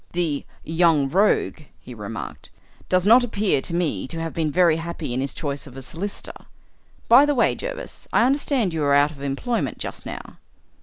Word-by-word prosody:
"The 165 -5 -1 0.2
'young 160 -4 +2
rogue,'" 200 +4 +2 0.2
he - - -11
remarked, - - -7 0.4
"does 185 0 +2
not 235 +4 +7
appear 210 - 0
to 170 - -1
me 155 - -1
to 165 - -6
have 165 0 -4
been 160 -2 0
very 170 0 +3
happy 165 -5 -5
in 130 - -1
his 135 - -2
choice 145 -2 -4
of 135 -1 -12
a 135 - -7
solicitor. 185 +9 -7 0.6
By 245 +4 +8
the 290 - +1
way, 240 - +3
Jervis, - - -7
I - - +4
understand 260 - +1
you 160 -2 -1
are 140 -1 +3
out 145 +1 +4
of 140 -3 -13
employment 140 - -2
just - - -7
now?" - - -8
165 Hz, 190 wpm, -23 LUFS, 145-210 Hz, 0.6 s, By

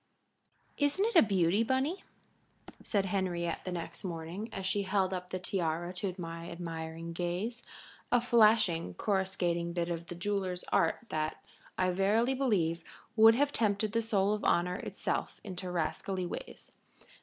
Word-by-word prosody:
"Isn't 290 +8 +3
it 460 - -1
a 330 - +10
beauty, 195 -1 +3
Bunny," 265 - 0 0.8
said 200 -3 0
Henriette 180 -3 -1
the 185 - -3
next 170 -2 -5
morning, 175 +4 -5
as 190 - -5
she 195 +2 +1
held 190 -1 +1
up 180 -1 -4
the 185 - -2
tiara 175 -2 -2
to 185 0 -3
my 165 -1 -6
admiring 165 -1 -5
gaze, 180 +8 -2 0.5
a 245 - +5
flashing, 215 - +4
coruscating 180 -4 0
bit 170 0 -1
of 170 0 -4
the 175 - -6
jeweler's 185 -1 -2
art 165 - +2
that, 155 0 -3 0.3
I 185 0 +2
verily 210 +7 +2
believe, 180 -11 +1 0.3
would 225 0 +8
have 285 +3 +2
tempted 210 -1 +1
the 230 - +1
soul 205 -3 +2
of 210 - -3
honor 180 +1 +2
itself - - -3
into 185 -2 -5
rascally 180 +2 -2
ways. - - -7
185 Hz, 150 wpm, -32 LUFS, 170-215 Hz, 0.8 s, a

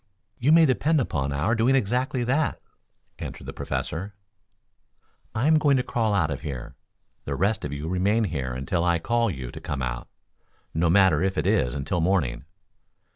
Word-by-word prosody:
"You 135 +5 +3
may 165 0 +7
depend 150 +3 +2
upon 70 - -1
our 75 +10 0
doing 120 +4 +3
exactly 125 +2 0
that," 140 +5 0 0.6
answered - - -7
the - - -6
Professor. 95 +5 -4 1.2
"I 110 +4 0
am 155 0 +5
going 145 -3 +3
to 125 - +1
crawl 110 -4 0
out 80 -6 +1
of 70 - -4
here. 65 -7 -6 0.5
The - - -2
rest 105 +4 0
of 75 - -4
you 70 +2 -4
remain 100 +6 +1
here 70 -10 -2
until 70 +7 -1
I 85 -1 +3
call 115 +7 +1
to 90 - -3
you 65 -2 -6
to - - -9
come 70 -3 -4
out, - - -4 0.7
no 85 +1 +1
matter 90 -3 +5
if 95 0 0
it 75 - 0
is 95 - +2
until 75 +5 -1
morning. 80 -9 0
95 Hz, 180 wpm, -25 LUFS, 75-120 Hz, 1.2 s, may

